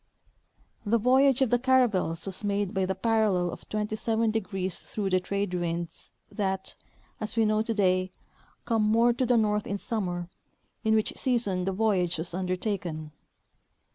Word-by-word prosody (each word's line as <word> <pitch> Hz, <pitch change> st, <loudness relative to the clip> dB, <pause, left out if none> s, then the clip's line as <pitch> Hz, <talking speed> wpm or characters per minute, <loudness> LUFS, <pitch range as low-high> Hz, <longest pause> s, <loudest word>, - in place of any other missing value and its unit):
The 230 Hz, +2 st, +2 dB
voyage 260 Hz, +3 st, +4 dB
of 255 Hz, -, -1 dB
the 245 Hz, -, +4 dB
caravels 235 Hz, -11 st, +2 dB
was 195 Hz, +1 st, -5 dB
made 200 Hz, -1 st, -1 dB
by 190 Hz, -1 st, 0 dB
the 190 Hz, -, -1 dB
parallel 215 Hz, -6 st, +1 dB
of -, -, -11 dB
27° 220 Hz, +1 st, 0 dB
flirough 190 Hz, +1 st, -3 dB
the 185 Hz, -, +4 dB
trade 200 Hz, +1 st, -2 dB
winds 170 Hz, -1 st, -4 dB, 0.2 s
that, 190 Hz, -3 st, -2 dB, 0.5 s
as 215 Hz, +1 st, -4 dB
we 225 Hz, -1 st, +3 dB
know 215 Hz, 0 st, +2 dB
today, 190 Hz, -5 st, +1 dB, 0.6 s
come 225 Hz, -2 st, +1 dB
more 230 Hz, +3 st, +4 dB
to 250 Hz, +1 st, -1 dB
the 245 Hz, 0 st, +4 dB
north 210 Hz, -1 st, +1 dB
m 200 Hz, -, -2 dB
summer, 180 Hz, -6 st, -3 dB, 0.6 s
in 220 Hz, -1 st, +3 dB
which 215 Hz, -, +1 dB
season 205 Hz, -8 st, 0 dB
the 195 Hz, -, 0 dB
voyage 190 Hz, -4 st, +1 dB
was 165 Hz, +2 st, -4 dB
under 185 Hz, 0 st, -1 dB
taken. 175 Hz, -6 st, -4 dB
205 Hz, 155 wpm, -28 LUFS, 185-225 Hz, 0.6 s, voyage